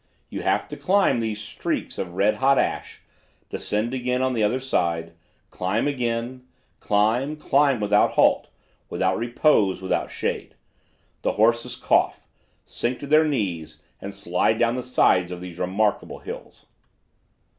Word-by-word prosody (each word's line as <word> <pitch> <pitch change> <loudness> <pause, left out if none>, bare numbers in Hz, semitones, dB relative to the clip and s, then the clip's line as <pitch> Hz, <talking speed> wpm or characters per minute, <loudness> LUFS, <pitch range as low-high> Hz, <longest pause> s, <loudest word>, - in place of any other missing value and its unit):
You - - -4
have - - 0
to - - -6
climb 195 -9 +2
these 110 -2 -2
streaks 105 - -4
of 90 -2 -4
red 100 +3 +2
hot 135 +1 +3
ash, - - -2 0.5
descend 110 +4 -2
again 125 0 -1
on 130 0 +1
the 115 - -1
other 110 +5 +2
side, 85 -10 -1 0.4
climb 95 +8 -1
again, 125 -2 -2 0.4
climb, 115 +8 +1
climb 140 -3 +2
without 105 0 +3
halt, - - +3 0.4
without 95 +2 0
repose, 120 -5 +2
without 95 0 -1
shade. - - -4 0.7
The - - 0
horses 115 +2 +2
cough, - - +2 0.5
sink 125 +1 -3
to - - -5
their 155 +2 +5
knees 85 - -3 0.2
and 100 - -6
slide 100 +2 0
down 115 0 +2
the 125 - -2
sides 90 -8 +2
of 90 - -5
these 90 -1 -9
remarkable 100 +4 0
hills. - - -10
110 Hz, 145 wpm, -24 LUFS, 95-130 Hz, 0.7 s, their